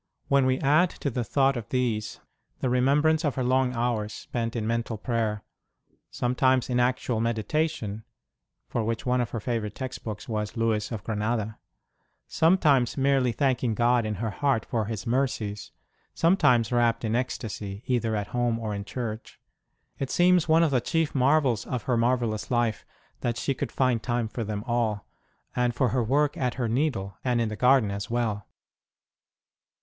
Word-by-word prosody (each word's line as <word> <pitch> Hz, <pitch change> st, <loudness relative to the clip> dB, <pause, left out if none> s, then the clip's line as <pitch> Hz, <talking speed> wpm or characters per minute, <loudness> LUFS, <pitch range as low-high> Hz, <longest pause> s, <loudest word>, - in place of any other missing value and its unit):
When 140 Hz, -1 st, +4 dB
we 130 Hz, 0 st, +1 dB
add 155 Hz, +6 st, +4 dB
to 140 Hz, -, -1 dB
the 120 Hz, 0 st, -1 dB
thought 135 Hz, +4 st, +2 dB
of 120 Hz, -4 st, -6 dB
these 115 Hz, -4 st, -1 dB, 0.4 s
the 130 Hz, -, 0 dB
remem 135 Hz, +4 st, +3 dB
brance 160 Hz, +1 st, +3 dB
of 145 Hz, -4 st, 0 dB
her 130 Hz, -, -1 dB
long 130 Hz, 0 st, +2 dB
hours 115 Hz, -3 st, -1 dB
spent 115 Hz, -1 st, -4 dB
in 110 Hz, -2 st, -2 dB
mental 115 Hz, 0 st, -1 dB
praycr 110 Hz, -2 st, -1 dB, 0.7 s
sometimes 130 Hz, +1 st, +1 dB
in 125 Hz, -, +2 dB
actual 125 Hz, -2 st, 0 dB
meditation 115 Hz, -1 st, -1 dB, 0.6 s
(for 115 Hz, -, -2 dB
which 115 Hz, 0 st, -2 dB
one 125 Hz, 0 st, +2 dB
of 120 Hz, -, -2 dB
her 115 Hz, -, -4 dB
favourite 110 Hz, -3 st, -3 dB
text 130 Hz, -1 st, -6 dB
books 110 Hz, -3 st, -6 dB
was 105 Hz, 0 st, -3 dB
Louis 115 Hz, -1 st, 0 dB
of 110 Hz, -3 st, -5 dB
Granada), 110 Hz, 0 st, -2 dB, 0.7 s
sometimes 150 Hz, -8 st, +3 dB
merely 135 Hz, -2 st, +2 dB
thanking 125 Hz, -3 st, 0 dB
God 120 Hz, +1 st, +3 dB
in 110 Hz, -1 st, -2 dB
her 110 Hz, +2 st, -3 dB
heart 135 Hz, -1 st, 0 dB
for 110 Hz, -2 st, -1 dB
His 110 Hz, -3 st, -5 dB
mercies, 115 Hz, -5 st, -1 dB, 0.4 s
sometimes 125 Hz, -, +3 dB
rapt 120 Hz, -1 st, +2 dB
in 110 Hz, +1 st, 0 dB
ecstasy, 105 Hz, -5 st, -4 dB
either 115 Hz, -3 st, 0 dB
at 105 Hz, -1 st, -3 dB
home 120 Hz, -2 st, 0 dB
or 110 Hz, -2 st, -3 dB
in 100 Hz, 0 st, -4 dB
church 110 Hz, +1 st, -6 dB, 0.6 s
it 135 Hz, -, -2 dB
seems 175 Hz, -2 st, +3 dB
one 165 Hz, +1 st, +5 dB
of 160 Hz, -, +2 dB
the 125 Hz, -3 st, +2 dB
chief 165 Hz, +5 st, 0 dB
marvels 135 Hz, -4 st, +2 dB
of 125 Hz, -3 st, -3 dB
her 125 Hz, -, 0 dB
marvellous 115 Hz, -2 st, 0 dB
life 120 Hz, -3 st, 0 dB, 0.3 s
that 120 Hz, -1 st, -2 dB
she 140 Hz, -, 0 dB
could -, -, -4 dB
find 130 Hz, -4 st, +1 dB
time 120 Hz, 0 st, -1 dB
for 115 Hz, +2 st, -4 dB
them 105 Hz, -1 st, -4 dB
all, 115 Hz, -5 st, -1 dB, 0.5 s
and 125 Hz, -1 st, +1 dB
for 130 Hz, -1 st, +2 dB
her 125 Hz, +1 st, +1 dB
work 145 Hz, +5 st, +1 dB
at 125 Hz, -2 st, -1 dB
her 120 Hz, -2 st, -1 dB
needle 115 Hz, -6 st, -1 dB
and 125 Hz, -2 st, +1 dB
in 115 Hz, -2 st, 0 dB
the 110 Hz, -, -4 dB
garden 125 Hz, -3 st, +4 dB
as 100 Hz, 0 st, -5 dB
well. 115 Hz, -4 st, -1 dB
120 Hz, 175 wpm, -26 LUFS, 110-130 Hz, 0.7 s, one